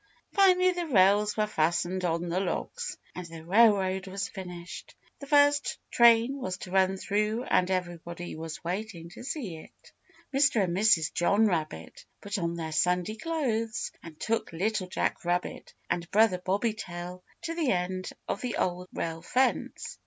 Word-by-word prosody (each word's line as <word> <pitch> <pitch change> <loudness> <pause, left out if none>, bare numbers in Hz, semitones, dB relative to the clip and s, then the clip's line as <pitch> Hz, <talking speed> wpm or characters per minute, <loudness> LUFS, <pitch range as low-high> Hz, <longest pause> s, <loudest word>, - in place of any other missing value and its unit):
Finally 370 -2 +5
the 350 -2 -3
rails 205 -3 +4
were 215 - +3
fastened 175 0 0
on 170 0 0
the 175 +2 0
logs 480 - -3 0.2
and 180 -1 -7
the 165 -1 -10
railroad 195 -1 +4
was 195 +3 -3
finished; 180 -4 -9 0.2
the 280 - -9
first 290 0 +4
train 235 +3 +5
was 185 -8 -3
to 180 - -9
run 190 0 +3
through 210 +4 0
and 185 -7 +2
everybody 175 -1 -4
was 160 +1 -7
waiting 175 -1 -4
to 175 - -10
see 245 - -4
it. 155 - -16 0.4
Mr. 275 -6 +4
and 175 -2 -1
Mrs. 185 -6 +3
John 200 +5 +3
Rabbit 155 - -2 0.2
put 200 0 -4
on 170 -1 -1
their 160 -2 -4
Sunday 180 +6 +1
clothes 230 -6 -2
and 160 -2 -12
took 225 0 -1
Little 190 +3 -1
Jack 185 - -1
Rabbit 175 +1 -2
and 175 0 -2
Brother 210 -3 +4
Bobby 200 +5 0
Tail 180 -3 -7 0.2
to 330 - -3
the 330 -5 0
end 185 0 -1 0.2
of - - -2
the 250 -2 -2
Old 180 0 -1
Rail 165 0 -4
Fence. 255 +9 -1
190 Hz, 160 wpm, -28 LUFS, 175-225 Hz, 0.4 s, Finally